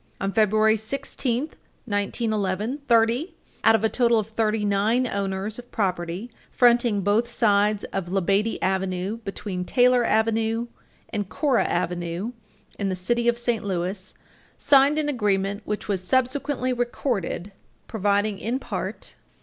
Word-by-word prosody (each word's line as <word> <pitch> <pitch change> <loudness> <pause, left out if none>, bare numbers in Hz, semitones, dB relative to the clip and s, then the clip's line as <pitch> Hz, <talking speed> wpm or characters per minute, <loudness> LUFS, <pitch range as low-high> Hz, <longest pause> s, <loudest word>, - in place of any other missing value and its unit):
On 195 0 -2
February 215 0 +3
16, 265 +3 -2 0.4
1911, 210 +2 -1
thirty 235 +7 +2 0.3
out 225 - +6
of 225 - 0
a - - +5
total 235 0 +2
of 215 -1 -1
thirty 220 -1 0
nine 210 +5 +2
owners 200 0 -3
of 245 0 -12
property 185 +1 -2 0.2
fronting 240 -4 +3
both 210 +5 +1
sides 210 -3 +2
of 195 -3 -3
Labadie 195 +4 +1
Avenue 190 +2 -1
between 195 -4 -5
Taylor 250 +4 +4
Avenue 225 +1 +1 0.4
and 205 -3 -3
Cora 275 -6 +1
Avenue 175 +4 -2 0.5
in 200 -2 0
the 185 - -1
city 235 +6 0
of 240 0 +3
St. 240 -2 -1
Louis, 190 0 -3 0.4
signed 280 +1 +4
an 305 -1 0
agreement, 205 -6 0
which 210 - -4
was 195 -3 -1
subsequently 260 +3 0
recorded, 240 -6 -2 0.4
providing 205 -1 0
in 235 +4 -1
part - - -5
215 Hz, 135 wpm, -24 LUFS, 195-240 Hz, 0.5 s, out